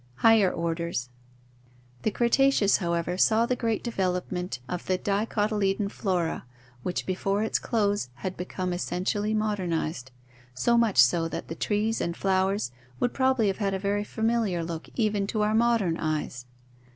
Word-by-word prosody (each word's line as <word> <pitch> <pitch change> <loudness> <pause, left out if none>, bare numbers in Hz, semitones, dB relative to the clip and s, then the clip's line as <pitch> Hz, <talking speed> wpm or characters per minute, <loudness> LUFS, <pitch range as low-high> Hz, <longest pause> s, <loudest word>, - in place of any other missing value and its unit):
Higher 215 - +5
Orders. 170 -6 -2 0.5
— 125 0 -30
The - - +1
Cretaceous, 235 -1 +3
however, 170 0 -1
saw 225 +3 +4
the 250 - 0
great 230 -3 -1
development 180 - -2
of 180 -1 -5
the 185 - +2
dicotyledon 205 0 0
flora 180 -7 -1 0.4
which 180 - -3
before 195 +2 0
its 220 - 0
close 205 - 0
had 185 +8 -5
be 180 - -5
come 185 -1 -3
essentially 205 +4 -1
modernized, 170 -10 -1 0.5
so 235 - +2
much 230 - +2
so 125 +7 +5
that - - -6
the - - -3
trees 215 +4 0
and 170 0 -2
flowers 190 -6 +1 0.3
would 245 - 0
probably 260 -4 +2
have 195 0 0
had 195 -2 0
a - - 0
very 200 +1 -1
familiar 220 -5 0
look 165 -1 -6
even 210 -4 +1
to 215 0 0
our 210 +1 +1
modern 225 -7 +2
eyes. 150 -6 -3
195 Hz, 155 wpm, -27 LUFS, 170-215 Hz, 0.5 s, Higher